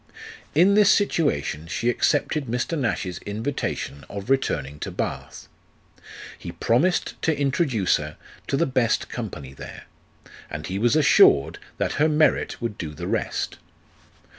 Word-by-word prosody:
In 180 +6 +6
this 205 -1 +6
situation 80 - +1
she 115 - -2
accepted 145 +4 +1
Mr. 125 +7 -1
Nash's 105 - -2
invitation 105 - -4
of 100 +4 -5
returning 75 - 0
to - - -4
Bath. - - -5 0.9
He - - -7
promised 150 +11 +1
to 160 -3 0
introduce 135 - +2
her 75 0 -7 0.3
to 135 - 0
the 170 - +3
best 130 -4 +1
company 75 - -6
there, - - -10 0.7
and 75 0 -6
he 95 +1 -3
was 120 +5 +3
assured 135 - +5 0.2
that - - -1
her 155 - +5
merit 155 0 +2
would 115 -3 -4
do 75 -3 -5
the 85 +3 -6
rest. - - -2
120 Hz, 140 wpm, -24 LUFS, -, 0.9 s, In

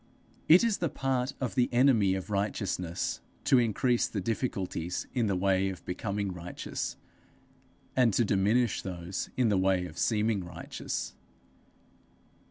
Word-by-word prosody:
It 170 +6 +8
is 230 -3 +1
the 170 - 0
part 130 -1 -1
of 130 -3 -2
the 125 - +2
enemy 120 -7 +4
of 95 +2 -5
righteousness 100 -3 -2 0.2
to 130 - +5
increase 120 +1 +2
the 105 - -3
difficulties 95 -5 -2
in 120 -4 +1
the 100 - +1
way 95 +1 +2
of 95 - -8
becoming 100 +1 -2
righteous, 90 0 -5 1.0
and 125 -3 +4
to 120 - +3
diminish 105 +5 +2
those 90 0 -5
in 125 -3 +3
the 100 -2 +2
way 95 -1 +2
of 85 -2 -8
seeming 110 -3 +1
righteous. 85 -1 -5
100 Hz, 140 wpm, -29 LUFS, 95-120 Hz, 1.0 s, It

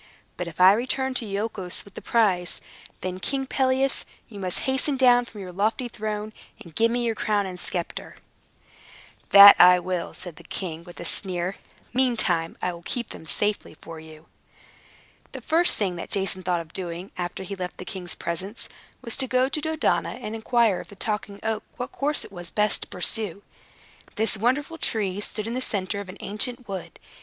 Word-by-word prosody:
But 180 - -4
if 170 0 -9
I 185 +1 +9
return 260 +4 -1
to 235 -3 -1
Iolchos 200 -3 -3
with 200 - -15
the - - -8
prize, 190 -7 +1 0.4
then, 185 0 -4
King 270 +6 -2
Pelias, 265 0 +1 0.2
you 210 -5 -10
must 185 -2 0
hasten 265 +1 +1
down 245 -2 +5
from 215 -3 -10
your 185 -1 -7
lofty 220 +7 0
throne, 215 -1 -4 0.3
and 170 - -13
give 230 +8 +3
me 240 +1 0
your 230 - +1
crown 210 -2 0
and 180 -1 -6
sceptre." 175 -1 -3 1.1
"That 200 0 +12
I 180 0 +9
will," 180 -1 -3
said 175 -4 -8
the - - -12
king, 170 -3 -4
with 175 - -12
a - - -6
sneer. 180 +1 -1 0.4
"Meantime, 220 -10 +1
I 180 - 0
will 170 - -10
keep 240 +7 -4
them - - -10
very - - -3
safely 205 -6 -1
for 165 -1 -9
you." 155 0 -13 1.1
The - - -5
first 335 +3 +3
thing 190 -4 -1
that - - -6
Jason 190 -2 +1
thought 180 -2 0
of 165 -1 -13
doing, 180 0 -5
after 175 +1 -4
he 200 +2 -5
left 180 -1 -5
the 185 - -7
king's 180 -2 -4
presence, 185 +6 -4 0.4
was 235 -3 0
to 265 -1 0
go 255 +1 +2
to 305 - -2
Dodona, 315 +1 0
and 240 -3 -6
inquire 225 -2 +2
of - - -9
the 200 - -13
Talking 205 0 -3
Oak 220 -1 -1 0.2
what 250 +1 -4
course 295 +2 -1
it - - -13
was 175 -3 -8
best 210 +1 +1
to - - -5
pursue. 200 +1 -1 0.7
This 220 0 +2
wonderful 275 +9 0
tree 205 -3 -1
stood 210 0 -4
in 230 - -3
the 255 - -2
center 200 -3 -2
of 200 -2 -7
an 185 - -9
ancient 235 +4 -1
wood. 190 -3 -6
205 Hz, 195 wpm, -25 LUFS, 180-240 Hz, 1.1 s, That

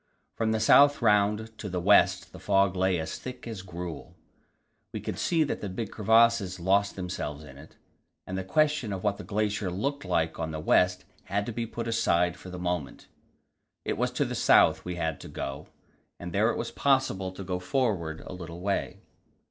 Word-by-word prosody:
From 110 -1 0
the 110 - +1
south 145 +6 +6
round 105 +1 +2
to 105 - -5
the 90 -1 -2
west 100 +4 +4
the - - -11
fog 95 -2 +2
lay 95 -1 +1
as 80 0 -5
thick 130 0 -8
as 110 -5 -6
gruel. 90 -3 -7 0.8
We - - -4
could - - -5
see 165 -2 +2
that 145 - -3
the 100 - -4
big 100 +3 -5
crevasses 110 -3 +3
lost 100 +3 +2
themselves 90 -5 -5
in 70 -2 -13
it, 80 - -15 0.5
and 95 - -5
the 95 - -2
question 145 0 +1
of 95 - -5
what 100 -1 0
the - - -6
glacier 105 -2 -1
looked 140 +11 -2
like 80 0 -1
on 80 -1 -2
the 80 -1 -5
west 90 +3 +2 0.2
had 100 +1 -1
to 120 - -4
be 115 +1 -3
put 115 +1 -5
aside 90 -7 +2
for 90 - -11
the 90 - -7
moment. 90 -5 -4 0.8
It - - -1
was - - 0
to - - +1
the - - -4
south - - +4
we 90 0 -4
had 80 -3 -2
to - - -9
go, 70 0 -6 0.5
and 90 -1 -7
there 105 +3 +3
it - - -1
was - - -4
possible 130 -9 +1
to 95 - -7
go 90 -1 -3
forward 90 -6 -1
a - - -9
little 85 -2 -8
way. 100 +2 -2
95 Hz, 200 wpm, -28 LUFS, 90-110 Hz, 0.8 s, south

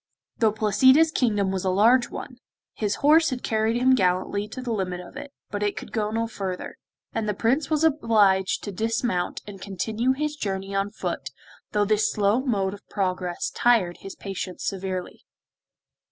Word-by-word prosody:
Though 220 -2 +4
Placida's 260 +9 +4
kingdom 205 -8 +1
was 190 -1 -2
a 190 - +1
large 235 +6 +4
one; 250 -4 -8 0.4
his 210 -2 -1
horse 320 +2 +6
had 255 -3 -4
carried 220 +1 +1
him 255 +2 +4
gallantly 190 -1 +1
to 235 - -8
the 250 -2 -4
limit 185 -4 -2
of 180 +6 -11
it, 285 +1 -8 0.2
but 205 - -3
it 205 0 -1
could - - -7
go 210 -2 -1
no 225 +1 -1
further, 195 -5 -5 0.4
and 215 -1 -1
the 210 - -1
Prince 265 +8 +1
was 310 -1 +1
obliged 215 -11 +3
to 205 - -4
dismount 220 -2 -1
and 195 -2 -10
continue 220 +6 -1
his 300 +2 -2
journey 195 -6 -4
on 195 +1 0
foot, 210 - -4 0.4
though 210 -2 +2
this 215 +1 +2
slow 210 +3 +2
mode 200 -7 0
of 205 - -13
progress 185 -3 -2
tired 220 -8 +2
his 195 - -9
patience 195 -2 -6
severely. 185 -2 -4
210 Hz, 175 wpm, -25 LUFS, 195-240 Hz, 0.4 s, horse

